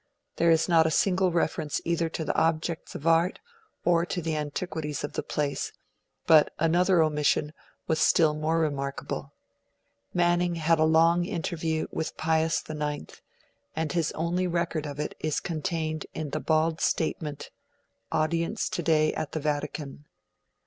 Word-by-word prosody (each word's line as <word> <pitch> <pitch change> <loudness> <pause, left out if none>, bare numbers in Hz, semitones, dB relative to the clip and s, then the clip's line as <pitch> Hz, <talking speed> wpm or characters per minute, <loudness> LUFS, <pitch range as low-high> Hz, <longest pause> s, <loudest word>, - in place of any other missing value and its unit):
There 170 - +3
is 165 -1 +4
not 165 -2 +5
a 160 - +1
single 185 -1 +2
reference 160 -3 0
either 170 -1 0
to 160 0 -4
the 145 - 0
objects 165 +1 0
of 150 - -7
art 165 +2 +3 0.5
or 170 -1 +4
to 180 +1 -3
the 160 -2 -2
antiquities 150 0 -3
of 145 - -4
the - - -1
place; 145 -2 -2 0.5
but 155 -2 +6
another 175 +2 +3
omission 150 0 +1 0.3
was 160 -1 0
still 160 -3 +4
more 155 +2 0
remarkable. 140 -4 -3 0.8
Manning 175 0 +2
had 165 0 +2
a 155 - +5
long 165 +2 +4
interview 160 -2 -2
with 160 - -4
Pius 160 0 +1
IX, 150 -1 -5 0.5
and 160 -1 -1
his 165 -1 0
only 175 +3 -1
record 170 -3 -1
of 145 0 -7
it 150 - -2
is 155 -2 -1
contained 160 -2 -3
in 155 -3 -4
the - - -1
bald 160 0 +1
statement: 150 -2 -1 0.6
'Audience 165 +6 0
today 155 -2 +2
at 155 - -4
the 160 - -1
Vatican'. 150 -1 -3
160 Hz, 150 wpm, -27 LUFS, 150-170 Hz, 0.8 s, but